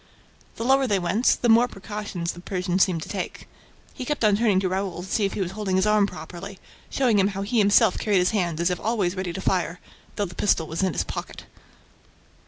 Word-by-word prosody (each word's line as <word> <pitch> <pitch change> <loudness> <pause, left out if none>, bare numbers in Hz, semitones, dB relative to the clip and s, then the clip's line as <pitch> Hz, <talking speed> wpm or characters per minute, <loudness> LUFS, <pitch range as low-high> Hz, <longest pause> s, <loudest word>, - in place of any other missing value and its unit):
The - - -5
lower 270 +1 +4
they 205 -4 +2
went, 190 +7 +2
the - - +4
more 235 +2 +6
precautions 195 -5 -5
the 175 - -11
Persian 180 0 -2
seemed 180 -4 +2
to - - -10
take. - - -5 0.5
He - - -6
kept 295 0 -2
on 210 -1 +4
turning 210 -3 +2
to 185 - 0
Raoul 185 -1 -3
to - - -9
see 205 +1 +1
if 195 - -2
he - - -3
was 180 -2 -2
holding 195 -2 -2
his 190 +1 +3
arm 210 -1 +3
properly, 195 +1 -9 0.3
showing 245 -6 +2
him 195 - +4
how 195 - -2
he 230 +3 0
himself 200 -2 +4
carried 205 -2 +1
his 180 0 +3
hand 175 -7 -1
as 170 +2 +1
if 180 - -2
always 205 -5 0
ready 185 -2 -3
to 190 - -6
fire, 180 -2 -1 0.4
though 205 - 0
the 175 - -9
pistol 175 -5 +1
was 160 +3 -4
in 190 -3 +1
his - - 0
pocket. - - -7
195 Hz, 230 wpm, -24 LUFS, 180-210 Hz, 0.5 s, more